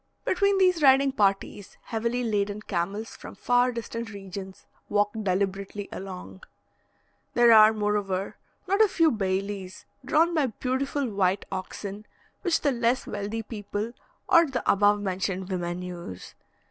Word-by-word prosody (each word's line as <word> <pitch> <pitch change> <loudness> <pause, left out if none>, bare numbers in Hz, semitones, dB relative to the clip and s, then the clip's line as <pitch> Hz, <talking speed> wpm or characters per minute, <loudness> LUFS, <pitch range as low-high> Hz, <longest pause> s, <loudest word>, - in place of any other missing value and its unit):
Between 400 +1 +2
these 365 -3 +3
riding 270 0 +5
parties, 200 -3 -1
heavily 235 +2 -2
laden 205 -2 -1
camels 200 +4 -3
from - - -10
far 245 +1 +2
distant 235 -1 -5
regions 195 -1 -8 0.2
walk 205 0 +2
deliberately 200 0 -2
along. 180 - -8 0.9
There 240 -1 +6
are, 215 0 +8
moreover, 205 -3 -1 0.3
not 395 +3 +2
a 435 - +7
few 330 -4 +3
bailis, 195 -2 -3 0.2
drawn 320 +6 +3
by 305 -5 +2
beautiful 260 +4 -2
white 195 -3 0
oxen, 200 +2 -6 0.3
which 350 -4 +1
the 285 - +2
less 240 +1 +1
wealthy 210 +2 -4
people 210 +1 -5 0.3
or 335 -1 +6
the 255 -5 -4
above 205 +1 +4
mentioned 190 -1 -2
women 175 -1 -3
use. 175 - -8
210 Hz, 135 wpm, -26 LUFS, 195-250 Hz, 0.9 s, are